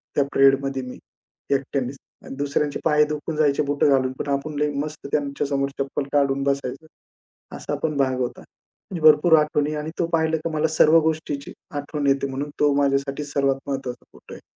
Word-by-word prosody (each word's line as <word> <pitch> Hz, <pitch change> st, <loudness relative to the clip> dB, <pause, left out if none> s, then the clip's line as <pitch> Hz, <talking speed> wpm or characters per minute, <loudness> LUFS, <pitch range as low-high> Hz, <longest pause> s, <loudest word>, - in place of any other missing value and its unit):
त्या 145 Hz, -, +4 dB
परेडमध्ये 135 Hz, 0 st, +3 dB
मी 125 Hz, -, -8 dB, 0.6 s
एकट्यानेच. 135 Hz, -1 st, -3 dB, 0.3 s
आणि -, -, -8 dB
दुसऱ्यांचे 145 Hz, +1 st, -1 dB
पाय 150 Hz, -1 st, +5 dB
दुखून 150 Hz, +1 st, -4 dB
जायचे 150 Hz, -1 st, +2 dB
बुट 145 Hz, 0 st, -1 dB
घालून. 130 Hz, -2 st, +3 dB
पण -, -, -3 dB
आपण 145 Hz, +2 st, -3 dB
लई 150 Hz, 0 st, +2 dB
मस्त 150 Hz, -1 st, -7 dB
त्यांच्या 140 Hz, -1 st, -1 dB
समोर 140 Hz, 0 st, 0 dB
चप्पल 140 Hz, +1 st, -2 dB
काढून 140 Hz, -1 st, +2 dB
बसायचं. 140 Hz, +1 st, -2 dB, 0.7 s
असा -, -, -4 dB
पण 155 Hz, -2 st, 0 dB
भाग 130 Hz, -2 st, +1 dB
होता. 125 Hz, -, -3 dB, 0.5 s
म्हणजे 175 Hz, -4 st, -4 dB
भरपूर 160 Hz, +2 st, +5 dB
आठवणी 150 Hz, 0 st, 0 dB
आणि 150 Hz, +1 st, -4 dB
तो 170 Hz, -, +1 dB
पाहिलं 160 Hz, 0 st, +2 dB
की 165 Hz, -, +1 dB
मला 155 Hz, +1 st, +2 dB
सर्व 160 Hz, +2 st, +6 dB
गोष्टीची 155 Hz, -3 st, -2 dB, 0.2 s
आठवण 145 Hz, 0 st, -3 dB
येते 140 Hz, 0 st, +2 dB
म्हणून 140 Hz, +2 st, -4 dB
तो 145 Hz, -1 st, +4 dB
माझ्यासाठी 140 Hz, +1 st, 0 dB
सर्वात 140 Hz, -1 st, 0 dB
महत्वाचा 135 Hz, -3 st, -4 dB
फोटो -, -, -14 dB
आहे. -, -, -11 dB
140 Hz, 175 wpm, -23 LUFS, 135-150 Hz, 0.7 s, सर्व